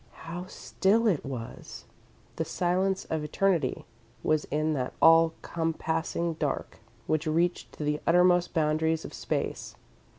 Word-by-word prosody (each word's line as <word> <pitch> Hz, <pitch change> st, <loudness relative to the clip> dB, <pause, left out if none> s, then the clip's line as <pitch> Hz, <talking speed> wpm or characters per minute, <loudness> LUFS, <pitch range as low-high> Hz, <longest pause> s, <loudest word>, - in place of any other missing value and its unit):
How 175 Hz, +2 st, -6 dB
still 210 Hz, +4 st, +1 dB
it 190 Hz, -10 st, +2 dB
was! 125 Hz, -4 st, -7 dB, 0.5 s
The -, -, 0 dB
silence 185 Hz, +2 st, 0 dB
of 160 Hz, -1 st, -1 dB
eternity 165 Hz, -2 st, 0 dB, 0.4 s
was 155 Hz, -1 st, +1 dB
in 155 Hz, +1 st, 0 dB
that 130 Hz, -3 st, -2 dB
all 165 Hz, 0 st, +6 dB
compassing 165 Hz, 0 st, -2 dB
dark, -, -, -3 dB, 0.3 s
which 155 Hz, +1 st, 0 dB
reached 170 Hz, +3 st, 0 dB
to -, -, -6 dB
the 150 Hz, 0 st, -1 dB
uttermost 180 Hz, +1 st, +4 dB
boundaries 160 Hz, +1 st, +1 dB
of -, -, -8 dB
space. -, -, -3 dB
165 Hz, 130 wpm, -28 LUFS, 155-175 Hz, 0.5 s, all